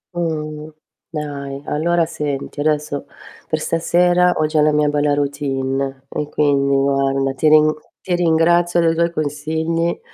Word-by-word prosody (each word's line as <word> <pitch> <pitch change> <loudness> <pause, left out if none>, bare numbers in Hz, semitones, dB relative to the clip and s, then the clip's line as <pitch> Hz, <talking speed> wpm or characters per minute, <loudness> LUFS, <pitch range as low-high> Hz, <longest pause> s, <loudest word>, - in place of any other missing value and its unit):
Mh, 155 -2 -3 0.4
dai 140 -3 -6
allora 170 +2 +1
senti 145 -3 -5
adesso 150 -1 -1 0.4
per 155 - +1
stasera 175 +2 +2
ho 155 - +2
già 155 0 +1
la 150 0 +4
mia 150 0 +2
bella 145 0 +1
routine 135 -1 -2
e 150 -1 -4
quindi 140 -2 +2
guarda, 135 0 +1
ti 155 +3 +2
rin 155 0 +5 0.3
ti 180 - -3
ringrazio 175 +1 +3
dei 165 -1 +3
tuoi 170 +1 +1
consigli 160 +2 -2
150 Hz, 135 wpm, -19 LUFS, 140-165 Hz, 0.4 s, rin